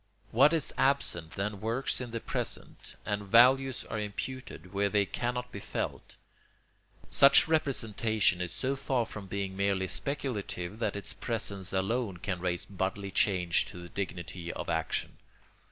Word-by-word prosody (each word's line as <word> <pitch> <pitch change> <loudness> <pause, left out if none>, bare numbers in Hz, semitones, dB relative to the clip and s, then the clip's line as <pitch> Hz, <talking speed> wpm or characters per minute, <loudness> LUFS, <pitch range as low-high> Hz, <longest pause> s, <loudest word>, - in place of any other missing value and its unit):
What 135 +7 +6
is 165 -4 +1
absent 85 - +2
then 100 0 -3
works 115 +4 -1
in 125 - -5
the 115 0 -3
present, - - -4
and 105 0 -1
values 125 +5 +5
are 110 - -4
imputed 105 -3 -6
where 100 +1 +1
they 100 0 +2
cannot 125 +4 -3
be 100 - -6
felt. - - -5 1.0
Such 140 +5 +8
representation 110 - +1
is 90 -2 -3
so 135 +1 -1
far 130 -3 0
from 105 -3 -8
being 95 0 -3
merely 100 -1 +1
speculative 105 -7 -2
that 105 -4 -1
its 100 - -2
presence 100 -5 -2
alone 95 +1 -1
can 90 0 -3
raise 90 -1 -2
bodily 100 +1 -3
change 90 -4 +3
to - - -10
the 85 0 -9
dignity 90 -2 -5
of - - -5
action. 80 -1 -2
100 Hz, 150 wpm, -30 LUFS, 95-125 Hz, 1.0 s, Such